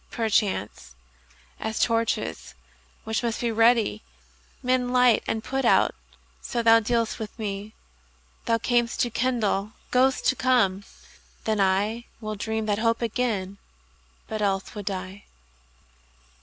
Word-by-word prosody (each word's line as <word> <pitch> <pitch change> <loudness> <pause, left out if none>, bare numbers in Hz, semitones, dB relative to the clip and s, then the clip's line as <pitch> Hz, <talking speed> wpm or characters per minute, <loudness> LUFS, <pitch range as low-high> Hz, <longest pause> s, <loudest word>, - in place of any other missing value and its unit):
Perchance, 200 - -1 0.6
as 220 0 -3
torches, 230 -1 -1 0.5
which 220 0 -1
must 235 0 -2
ready 230 0 +4
be, 105 +1 -6 0.6
Men 250 0 +1
light 250 -2 +5
and 220 0 -2
put 265 +2 -2
out, 235 - +4 0.5
so 235 -1 -2
thou 230 0 +7
dealst 230 0 -1
with 220 0 -7
me. 205 -1 -5 0.7
Thou 230 - +2
cam'st 240 0 0
to 240 - 0
kindle, 220 -4 0 0.2
goest 260 +1 +2
to - - +3
come: 215 -7 +2 0.6
then 220 -1 0
IWill 215 +3 -1
dream 220 0 -2
that 205 -1 0
hope 230 +1 +1
again, 210 -5 -2 0.7
but 215 -1 -4
else 195 -2 -1
would 205 -3 -7
die. 190 0 -5
225 Hz, 125 wpm, -25 LUFS, 205-240 Hz, 0.7 s, thou